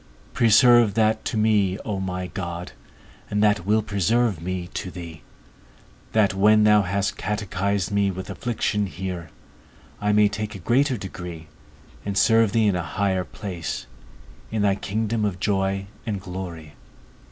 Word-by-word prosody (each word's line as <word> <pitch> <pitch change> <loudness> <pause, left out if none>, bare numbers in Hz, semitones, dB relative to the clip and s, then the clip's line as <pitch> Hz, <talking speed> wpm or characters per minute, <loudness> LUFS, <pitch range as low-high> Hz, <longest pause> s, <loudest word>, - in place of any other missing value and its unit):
Preserve 115 -1 +5
that 110 -1 +2
to - - -2
me, 105 -3 +2
O 100 -3 -2
my 90 -1 -3
God, 85 -1 -5 0.6
and 105 +1 +1
that 105 -3 +2
will 110 +1 +3
preserve 105 -1 +1
me 90 0 -3
to 95 - -4
thee; 85 -3 -9 0.9
that, 105 -3 +3
when 105 +2 +5
thou 105 0 +6
hast 100 +1 -1
catechised 100 -2 -1
me 100 -1 +2
with 95 0 -5
affliction 105 -4 -1
here, 90 -3 -5 0.7
I 105 0 +2
may 105 0 +5
take 105 +1 -4
a - - -5
greater 125 - +1
degree, 90 -4 -8 0.5
and 100 -1 -3
serve 115 -2 +4
thee 115 -2 +2
in 100 -3 +3
a 90 - 0
higher 95 +3 -1
place, 90 - -5 0.6
in 110 -2 -1
thy 100 -1 +4
kingdom 110 +3 -2
of 100 -4 -1
joy 95 -1 0 0.2
and 105 -3 -3
glory. 90 -5 -7
100 Hz, 150 wpm, -24 LUFS, 90-105 Hz, 0.9 s, thou